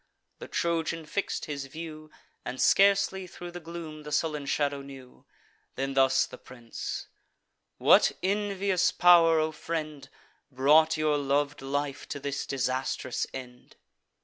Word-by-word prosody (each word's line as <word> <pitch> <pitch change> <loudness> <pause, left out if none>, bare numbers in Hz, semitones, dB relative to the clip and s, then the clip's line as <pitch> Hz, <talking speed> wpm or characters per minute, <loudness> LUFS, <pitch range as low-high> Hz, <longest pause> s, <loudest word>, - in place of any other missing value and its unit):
The - - -8
Trojan 165 -1 -1
fix'd 200 +6 -3
his 140 -2 -5
view, 155 +1 -9 0.3
And 130 +1 -6
scarcely 195 -1 +3
thro' 175 0 -9
the 175 - -7
gloom 165 -2 -8
the 150 0 -9
sullen 150 -1 -1
shadow 140 0 0
knew. 135 -2 -13 0.5
Then 135 +1 -2
thus 135 -1 +4
the - - -12
prince: 120 -3 -7 0.7
"What - - +5
envious 195 -2 +1
pow'r, 170 -2 +6
O 155 0 +1
friend, 155 -4 -5 0.4
Brought 150 +4 +4
your 155 -1 +1
lov'd 145 +1 0
life 140 +1 -3
to 145 - -4
this 140 0 -4
disastrous 130 -1 -2
end? 125 -2 -10
150 Hz, 130 wpm, -28 LUFS, 135-165 Hz, 0.7 s, pow'r